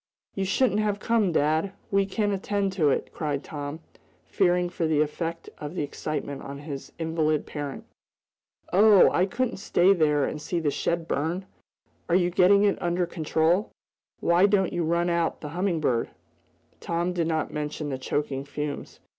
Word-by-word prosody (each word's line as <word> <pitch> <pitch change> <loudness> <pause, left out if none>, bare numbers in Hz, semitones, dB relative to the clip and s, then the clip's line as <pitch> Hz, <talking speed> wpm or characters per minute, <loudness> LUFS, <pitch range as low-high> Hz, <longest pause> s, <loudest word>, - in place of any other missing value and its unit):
"You 195 - -2
shouldn't 210 +2 +2
have 210 -1 0
come, 225 -6 +2
dad! 160 +5 +1 0.2
We 195 0 +2
can 205 +1 0
attend 200 0 -1
to 160 -6 +2
it!" - - -1
cried 145 -3 -2
Tom, 145 +1 -6 0.4
fearing 180 -2 +2
for 170 -2 -2
the 155 -2 +2
effect 165 +2 -2
of 150 +3 -6
the 175 - -1
excitement 145 -1 -4
on 140 0 -7
his 140 -1 -7
invalid 160 -2 0
parent. 145 -2 -6 0.9
"Oh, 205 +1 +7
I 185 +2 +2
couldn't 255 +5 -2
stay 190 -1 +3
there 150 -5 +2
and 150 - -4
see 170 +3 -2
the 150 -3 0
shed 170 +3 -1
burn. 170 +6 -1 0.6
Are 170 - +3
you 180 -1 +3
getting 200 +3 +5
it 205 -1 +2
under 175 +1 0
control? 165 +4 +1 0.5
Why 175 +3 +4
don't 195 -2 +2
you 175 - 0
run 170 +2 +1
out 170 -1 0
the 150 - -6
Humming 175 +1 -1
Bird?" 125 -6 0 0.7
Tom 170 +2 -1
did 170 -2 0
not 160 -2 -1
mention 150 0 -3
the 130 -2 -3
choking 135 0 -2
fumes. 145 +1 -5
170 Hz, 170 wpm, -26 LUFS, 150-190 Hz, 0.9 s, Oh